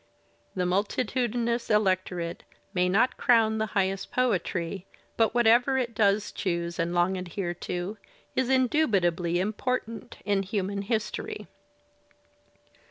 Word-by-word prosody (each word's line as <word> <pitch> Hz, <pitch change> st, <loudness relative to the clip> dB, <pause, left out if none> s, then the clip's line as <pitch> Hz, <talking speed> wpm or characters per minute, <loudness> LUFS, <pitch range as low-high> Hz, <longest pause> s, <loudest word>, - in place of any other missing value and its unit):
The 180 Hz, -1 st, 0 dB
multitudinous 235 Hz, +4 st, 0 dB
electorate 185 Hz, -5 st, 0 dB, 0.3 s
may 180 Hz, -1 st, +2 dB
not 220 Hz, +7 st, +2 dB
crown 220 Hz, -2 st, +3 dB
the 220 Hz, -, 0 dB
highest 195 Hz, 0 st, 0 dB
poetry, 195 Hz, -6 st, -1 dB, 0.3 s
but 225 Hz, 0 st, +2 dB
whatever 240 Hz, +3 st, +4 dB
it 240 Hz, -3 st, -1 dB
does 205 Hz, -1 st, +2 dB
choose 170 Hz, -1 st, -2 dB
and 170 Hz, +1 st, 0 dB
long 175 Hz, +2 st, +2 dB
adhere 180 Hz, 0 st, -3 dB, 0.2 s
to 180 Hz, +4 st, -3 dB, 0.4 s
is 260 Hz, -1 st, +1 dB
indubitably 195 Hz, -, +2 dB
important 225 Hz, +3 st, -3 dB
in 200 Hz, -1 st, +2 dB
human 200 Hz, 0 st, -2 dB
history. 250 Hz, -, -3 dB
205 Hz, 110 wpm, -27 LUFS, 180-235 Hz, 0.4 s, whatever